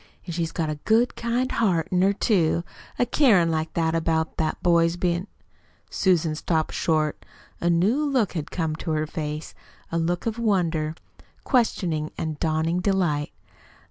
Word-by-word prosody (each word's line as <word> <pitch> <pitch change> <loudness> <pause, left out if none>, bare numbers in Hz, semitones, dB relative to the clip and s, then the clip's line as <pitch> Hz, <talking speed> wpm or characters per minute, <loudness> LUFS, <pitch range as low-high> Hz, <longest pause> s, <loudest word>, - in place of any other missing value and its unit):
"An' 175 - -5
she's 165 -1 -2
got 165 -2 -2
a 150 - -5
good 230 +3 +3
kind 240 +2 -1
heart 185 -8 +1
in 180 -1 +2
her, 195 +1 +4
too, 175 -5 +1 0.3
a 245 - +2
carin' 215 - +4
like 160 0 -2
that 160 -1 +1
about 160 -1 0
that 155 -1 0
poor 170 -1 +4
boy's 165 +1 +1
bein' 175 +1 -1 0.3
" - - -36
Susan 175 -5 +2
stopped 160 0 -1
short. 155 -2 0 0.4
A 175 - +1
new 195 - +2
look 260 -9 +1
had 160 -4 -4
come 160 -3 -2
to 165 - -6
her 155 0 0
face 150 0 -5 0.4
a 165 - 0
look 175 +2 -1
of 230 0 -2
wonder, 170 -8 0 0.5
questioning, 175 - +1
and 155 -2 -3
dawning 160 +2 0
delight. 180 -7 0
170 Hz, 170 wpm, -24 LUFS, 160-195 Hz, 0.5 s, her